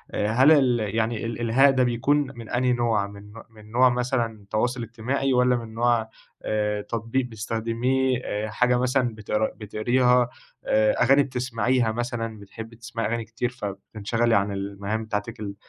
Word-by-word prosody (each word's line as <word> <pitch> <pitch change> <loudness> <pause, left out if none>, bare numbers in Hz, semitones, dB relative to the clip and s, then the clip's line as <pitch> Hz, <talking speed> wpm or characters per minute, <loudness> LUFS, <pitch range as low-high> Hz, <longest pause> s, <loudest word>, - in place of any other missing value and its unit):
هل 120 +8 +4
ال 120 -8 +3
يعني 115 0 -1
ال 115 - -2
الإلهاء 120 +4 +3
ده 130 -1 +2
بيكون 120 +4 +2 0.2
من 115 -2 -9
أنهي 125 +1 +1
نوع؟ 115 -4 +1
من 100 0 -12
نو 115 - -11
من 110 -1 -16
نوع 125 +2 +5
مثلًا 120 -4 -2
تواصل 120 +3 0
اجتماعي؟ 125 +4 -1
والَّا 125 0 +4
من 115 -2 -6
نوع 115 -1 +1 0.3
آآ، 105 -1 -1
تطبيق 115 +4 -2
بتستخدميه، 120 +3 -1
آآ، 105 +1 -3
حاجة 125 +3 +2
مثلًا 125 -2 +1
بت 105 -2 -10 0.2
بتقريها، 120 +3 +2 0.4
آآ، 110 0 +3
أغاني 135 +3 +5
بتسمعيها 125 -2 0
مثلًا، 115 -1 -4
بتحبي 115 +3 -10
تسمعي 115 0 -4
أغاني 115 0 -2
كتير 115 +3 -3
فبتنشغَلي 110 +1 -2
عن 100 +1 +1
المهام 100 +2 -4
بتاعتِك 105 -2 -4
ال 100 -2 -5
115 Hz, 155 wpm, -25 LUFS, 110-125 Hz, 0.4 s, نوع